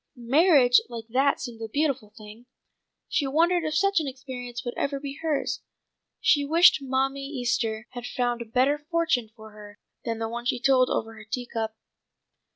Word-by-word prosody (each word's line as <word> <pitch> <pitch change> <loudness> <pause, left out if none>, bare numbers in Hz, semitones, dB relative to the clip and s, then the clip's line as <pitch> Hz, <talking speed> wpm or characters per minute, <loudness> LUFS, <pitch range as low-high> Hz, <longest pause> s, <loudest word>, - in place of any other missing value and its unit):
Marriage 260 +1 +5
like 230 -2 -7
that 270 +4 +2
seemed 230 -3 -7
a 225 - -4
beautiful 270 -4 -1
thing; 215 +2 -13 0.6
she 285 - 0
wondered 335 +5 +2
if 310 0 -2
such 395 +2 +3
an 310 - -3
experience 255 -2 -7
would 240 - -3
ever 280 0 -2
be 280 0 -7
hers. 315 -3 -1 0.6
She 290 - +3
wished 330 +5 +5
Mammy 270 +1 -1
Easter 240 -5 -2
had 245 -1 -7
found 245 -1 -1
a - - -5
better 260 +6 +2
fortune 315 -7 0
for 220 -1 -13
her 205 -1 -13 0.3
than 230 -2 -3
the 225 0 -2
one 235 +1 -6
she 245 - 0
told 260 0 +4
over 225 0 -2
her 220 -1 -12
tea 245 +1 -3
cup. 220 -2 -4
255 Hz, 175 wpm, -26 LUFS, 230-285 Hz, 0.6 s, Marriage